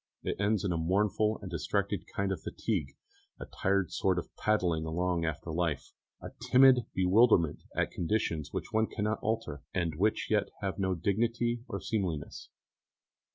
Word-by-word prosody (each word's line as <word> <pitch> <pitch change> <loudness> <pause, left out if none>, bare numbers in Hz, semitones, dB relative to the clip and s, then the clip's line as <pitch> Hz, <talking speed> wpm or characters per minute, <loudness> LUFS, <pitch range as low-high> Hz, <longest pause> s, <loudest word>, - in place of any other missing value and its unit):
It - - -1
ends 105 -1 +1
in 95 - 0
a 85 - 0
mournful 105 +5 +1
and 95 - -6
distracted 100 +2 -1
kind 100 0 -2
of 95 - -3
fatigue, 80 -12 -3 0.4
a - - -6
tired 100 -2 0
sort 95 -2 +1
of 90 - -5
padding 90 -7 +1
along 85 +1 -1
after 80 +1 -3
life, 80 -4 -2 0.3
a - - -8 0.2
timid 130 -2 +6
bewilderment 95 -3 +4
at - - 0
conditions 85 -5 -1
which - - -5
one 110 0 +3
cannot 105 +1 -2
alter, 110 -11 -2
and 85 -3 0
which 105 +6 0
yet - - +2
have 95 0 -3
no 95 -1 +1
dignity 115 +6 0
or 100 -4 -4
seemliness. 95 -10 -3
95 Hz, 155 wpm, -31 LUFS, 85-110 Hz, 0.4 s, timid